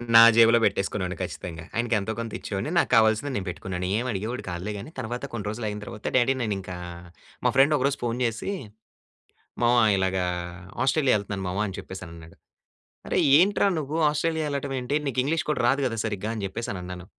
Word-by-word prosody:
నా 115 - +11
జేబులో 115 0 +7
పెట్టేసుకునేవాడిని 95 -3 0
ఖచ్చితంగా. 80 -2 -6
ఆయనకు 115 0 +1
ఎంతో 100 +3 -3
కొంత 115 -2 -4
ఇచ్చేవాడిని. 100 +8 -3
నాకు - - +3
కావాల్సింది 110 +5 +3
నేను 100 - -2
పెట్టుకునేవాడిని. 90 0 -4
ఏమి 125 - -2
అడిగేవాడు 110 +5 -3
కాదులే. 90 +4 -4
కానీ 100 - -8
తర్వాత 120 +2 -4
కొన్ని 110 -4 -5
రోజులు 110 +1 -4
అయిన 105 0 -5
తర్వాత, 105 0 -9
డ్యాడీ! 130 +1 +4
నేనింకా 95 -4 -3 0.7
మా - - +4
ఫ్రెండ్ 140 +3 +5
ఒకరోజు 140 +1 +1
ఫోన్ 120 0 -1
చేసి, 115 - -2 1.1
"మామ 120 +1 +4 0.2
!ఇలాగా 95 -1 0 0.6
ఆస్ట్రేలియా 135 0 +3
వెళ్తున్నాను 100 -1 -5
మామ" 90 - -3
అని 95 - -6
చెప్పేసి 95 0 -8
అని 85 - -11
అన్నాడు. 80 0 -13 0.7
"అరేయ్! - - +2
ఏంట్రా 200 +2 +3
నువ్వు 155 +2 -3
ఆస్ట్రేలియా 160 +1 -1
వెళ్ళడం 140 -1 -3
ఏంటి? 125 +4 -1
నీకు 130 -1 0
ఇంగ్లీష్ 160 +3 0
కూడా 150 - 0
రాదు 140 +2 +2
కదా! 115 -2 -3
సరిగ్గా" 105 0 -2
అని 105 - -4
చెప్పేసని 95 -1 -4
అన్నాను. 90 0 -8
110 Hz, 180 wpm, -26 LUFS, 95-130 Hz, 1.1 s, నా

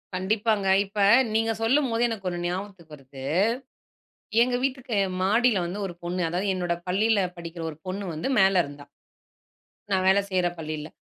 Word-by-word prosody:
கண்டிப்பாங்க. 205 +1 0 0.2
இப்ப 205 +2 -7 0.4
நீங்க 225 0 +2
சொல்லும்போதே 240 -1 +2
எனக்கு 195 -4 -4
ஒண்ணு 175 0 -4
ஞாபகத்துக்கு 180 -4 -6
வருது. 135 -1 -12 1.2
எங்க 245 0 0
வீட்டுக்கு 260 -5 -2 0.3
மாடில 215 0 +3
வந்து 180 +4 -5
ஒரு 175 - -5
பொண்ணு, 180 +1 -2
அதாவது 185 +4 -2
என்னோட 175 -2 -1
பள்ளியில 210 +4 +2 0.2
படிக்கிற 170 0 -7
ஒரு 150 - -13
பொண்ணு 195 +2 -3
வந்து 155 +8 -3
மேல 190 0 +5
இருந்தா. 145 0 -11 1.1
நான் 190 -1 +2
வேலை 195 +1 +5
செய்யிற 180 -2 +1
பள்ளியில. 155 -1 -5
190 Hz, 145 wpm, -26 LUFS, 175-220 Hz, 1.2 s, மேல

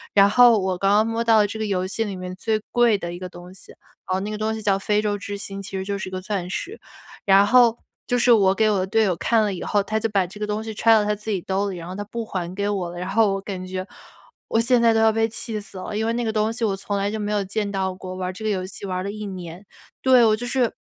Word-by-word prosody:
然 200 -1 +7
后 240 +1 +6
我 190 -1 -1
刚 195 +2 +1
刚 210 +2 +4
摸 225 +1 -1
到 225 -1 +4
了 210 - +5
这 210 - -6
个 220 - -1
游 185 -2 -1
戏 195 +4 -2
里 205 -3 -5
面 185 0 -6
最 215 +3 -1
贵 240 -3 +4
的 175 -3 -6
一 175 - -7
个 185 0 -6
东 175 +1 -12
西， 190 - -15 0.4
然 185 - -1
后 - - 0
那 205 - -4
个 215 - -4
东 215 +1 -1
西 - - -5
叫 200 -2 +2
非 210 +1 +1
洲 210 -1 0
之 200 0 -6
星， 195 -1 -6
其 195 0 -6
实 190 - -3
就 200 0 -2
是 190 - -5
一 - - -16
个 185 - -3
钻 185 -2 -3
石。 380 - -5 0.5
然 195 0 +6
后 235 +1 +5 0.3
就 245 - +1
是 245 0 +4
我 195 -4 +5
给 220 +2 +3
我 200 - +1
的 185 - -1
队 220 +3 +2
友 190 -4 +1
看 225 +5 +2
了 205 -2 -1
以 180 - -6
后 205 -1 +1
他 220 +2 -1
就 225 - -1
把 200 -3 +1
这 190 +4 -11
个 210 - -2
东 210 +1 -2
西 220 0 -6
揣 225 +2 +3
到 215 -1 +4
他 210 - +1
自 210 +1 -7
己 200 -3 0
兜 195 +3 -1
儿 - - -2
里， 185 - -6
然 170 0 -8
后 180 - -6
他 205 - -4
不 230 +2 -5
还 180 -4 -4
给 200 +1 -1
我 195 -4 -2
了。 175 - -9
然 180 +1 -4
后 205 0 +3
我 195 - -4
感 195 -2 -6
觉 185 0 -4 0.6
我 225 - +1
现 235 +1 +3
在 230 -1 +5
都 225 - +2
要 220 0 +5
被 225 +1 +1
气 220 0 -5
死 200 - -7
了， 185 +3 -6
因 215 - 0
为 230 - 0
那 240 +1 -1
个 220 - -1
东 215 0 +1
西 230 0 -2
我 200 -3 0
从 200 +1 -3
来 200 +1 -1
就 220 - -3
没 210 0 -2
有 205 -1 +1
见 205 +1 -3
到 190 -1 -1
过， 185 0 -8
玩 185 0 -3
儿 - - -5
这 200 - -9
个 215 - 0
游 185 -3 -1
戏 195 +1 -8
玩 185 -1 -2
儿 185 - -3
了 200 - -3
1 210 0 -6
年。 180 -1 -8 0.4
对， 255 -2 +6
我 215 -1 +4
就 245 +3 -6
是， 250 -2 +1
205 Hz, 345 characters per minute, -23 LUFS, 190-220 Hz, 0.6 s, 然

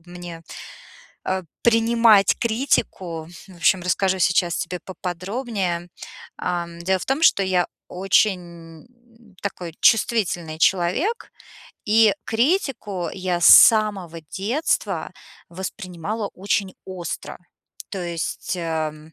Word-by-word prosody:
мне, 175 -1 -9 0.8
а, 190 0 -1 0.2
принимать 230 -3 +4
критику. 205 - -1 0.2
В 185 - -14
общем, 180 +3 +3
расскажу 190 +1 +1
сейчас 175 -1 +2
тебе 180 +2 -4
поподробнее. 185 0 -4 0.5
А, 175 -1 -2
дело 190 +2 +1
в - - -7
том, 275 +4 -1
что 200 - +5
я 185 -2 +1 0.2
очень 175 -3 -1 0.6
такой 180 -4 -5
чувствительный 180 -8 +2
человек, 195 - +1 0.5
и 215 -1 +4
критику 225 - -1
я 180 -2 -2
с - - +5
самого 205 -7 +6
детства 220 - -2 0.4
воспринимала 190 +3 -5
очень 195 0 -1
остро. 180 -3 -6 0.5
То 190 -3 -4
есть, 170 +2 -4
эм, 160 -2 -4
185 Hz, 100 wpm, -22 LUFS, 175-215 Hz, 0.8 s, самого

